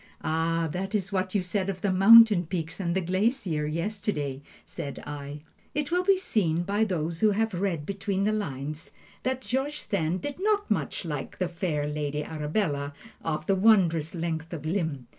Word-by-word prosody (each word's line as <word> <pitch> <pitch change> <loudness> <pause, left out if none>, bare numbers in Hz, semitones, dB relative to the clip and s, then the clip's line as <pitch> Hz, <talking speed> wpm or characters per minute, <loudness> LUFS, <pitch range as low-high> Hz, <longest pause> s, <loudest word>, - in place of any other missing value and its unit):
"'Ah, 165 +1 0
that 195 +5 -3
is 195 -1 -1
what 185 0 -1
you 195 - +2
said 190 +1 -1
of 185 -2 -4
the 200 - +1
mountain 200 -1 +8
peaks 165 0 -4
and 170 -2 -1
the 190 - +2
glacier, 185 - 0
yesterday,' 160 -5 -2 0.2
said 140 - -6
I." 145 0 -6 0.3
It 295 +1 -1
will 360 +1 +2
be 390 +1 +4
seen, 175 - +1
by 200 +4 +1
those 165 -4 -2
who 215 - +6
have 220 +1 0
read 175 -5 -1
between 195 +1 -2
the 210 - +2
lines, 155 -6 -4 0.3
that 260 0 -1
George 270 +4 -2
Sand 180 -3 -1
did 290 +3 -4
not 410 - +1
much 165 -3 -1
like 150 -4 -5
"the 185 - 0
fair 170 -4 -2
Lady 150 0 -2
Arabella 150 -2 -2 0.3
of 155 -1 -2
the 195 - +2
wondrous 185 -6 +3
length 165 -1 -3
of 155 -2 -6
limb." 160 -7 -1
180 Hz, 180 wpm, -27 LUFS, 155-205 Hz, 0.3 s, mountain